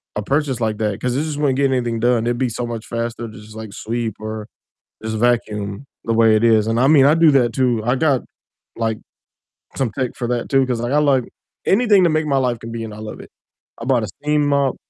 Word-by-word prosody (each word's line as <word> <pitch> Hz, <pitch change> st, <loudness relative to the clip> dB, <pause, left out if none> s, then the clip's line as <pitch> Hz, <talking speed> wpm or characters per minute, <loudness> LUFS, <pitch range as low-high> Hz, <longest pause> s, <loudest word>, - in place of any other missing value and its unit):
a 105 Hz, -, -1 dB
purchase 140 Hz, +1 st, 0 dB
like 110 Hz, -2 st, 0 dB
that 105 Hz, -2 st, -2 dB
'cause 125 Hz, -1 st, -1 dB
it 145 Hz, -, 0 dB
just 150 Hz, -2 st, -4 dB
wouldn't 140 Hz, -3 st, +1 dB
get 140 Hz, -1 st, +2 dB
anything 120 Hz, -3 st, -1 dB
done, 120 Hz, -1 st, +2 dB
it'd 120 Hz, 0 st, 0 dB
be 130 Hz, -1 st, 0 dB
so 120 Hz, +2 st, -4 dB
much 115 Hz, -1 st, -6 dB
faster 115 Hz, 0 st, -4 dB
to -, -, -13 dB
just, 105 Hz, +1 st, -13 dB
like, 110 Hz, -2 st, -8 dB
sweep 115 Hz, -1 st, -3 dB
or 110 Hz, 0 st, -6 dB, 0.6 s
just 110 Hz, 0 st, -3 dB
vacuum 110 Hz, -2 st, -1 dB, 0.2 s
the 115 Hz, -, 0 dB
way 115 Hz, -1 st, +5 dB
it 110 Hz, -, +1 dB
is, 110 Hz, -2 st, +4 dB
and 115 Hz, +1 st, 0 dB
I 130 Hz, -, +4 dB
mean, 145 Hz, -3 st, +6 dB
I 150 Hz, -, +5 dB
do 165 Hz, -1 st, +5 dB
that 125 Hz, -4 st, +3 dB
too, 120 Hz, -3 st, +1 dB
I 120 Hz, +3 st, +1 dB
got 140 Hz, -3 st, +2 dB, 0.5 s
like 115 Hz, -1 st, -1 dB, 0.8 s
some 130 Hz, -4 st, 0 dB
tech 130 Hz, -3 st, -1 dB
for 120 Hz, -, -3 dB
that 120 Hz, -1 st, -2 dB
too, 135 Hz, -1 st, +3 dB
'cause, 125 Hz, -2 st, -2 dB
like, 120 Hz, +2 st, -2 dB
I 150 Hz, -, +3 dB
like 140 Hz, -4 st, +3 dB, 0.4 s
anything 205 Hz, -2 st, +4 dB
to 170 Hz, -, +4 dB
make 155 Hz, 0 st, 0 dB
my 140 Hz, -2 st, +1 dB
life 125 Hz, -3 st, 0 dB
convenient, 115 Hz, -1 st, -6 dB
I -, -, -11 dB
love 110 Hz, 0 st, -8 dB
it, -, -, -12 dB, 0.5 s
I 115 Hz, -, -7 dB
bought 125 Hz, -3 st, +2 dB
a -, -, -5 dB
steam 150 Hz, +2 st, 0 dB
mop. 140 Hz, -2 st, +1 dB
120 Hz, 240 wpm, -20 LUFS, 110-135 Hz, 0.8 s, mean